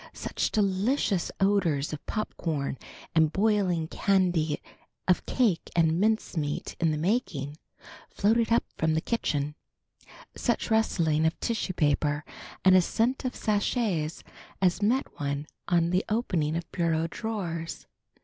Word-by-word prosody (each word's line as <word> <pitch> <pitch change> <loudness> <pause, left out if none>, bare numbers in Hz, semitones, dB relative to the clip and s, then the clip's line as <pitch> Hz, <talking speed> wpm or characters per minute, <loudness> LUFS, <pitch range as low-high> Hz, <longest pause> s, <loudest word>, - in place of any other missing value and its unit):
Such - - -2
delicious 200 0 +1
odors 175 -8 +2
of 150 - -6
popcorn 155 - -2 0.3
and 160 -2 +4
boiling 190 -5 +1
candy, 175 -6 +1 0.5
of 180 - +2
cake 225 -10 +1
and 165 0 +3
mincemeat 190 -8 -1
in 165 - +3
the 155 - 0
making 155 - -1 0.5
floated 225 +3 +2
up 230 - +4
from 160 0 +1
the - - +3
kitchen! 150 -11 -1 0.8
Such 240 -1 -1
rustling 165 -8 +2
of 160 - -2
tissue 220 -5 -1
paper 145 -1 +1 0.4
and 185 -1 +7
scent 245 +8 0
of 255 - -2
sachets 205 -6 0 0.4
as 185 +1 +2
met 240 +6 +2
one 140 0 -2 0.2
on 170 -2 +2
the 185 +1 +2
opening 175 -9 0
of 170 0 -4
bureau 165 -2 +1
drawers! 170 -4 -4
175 Hz, 125 wpm, -28 LUFS, 155-215 Hz, 0.8 s, and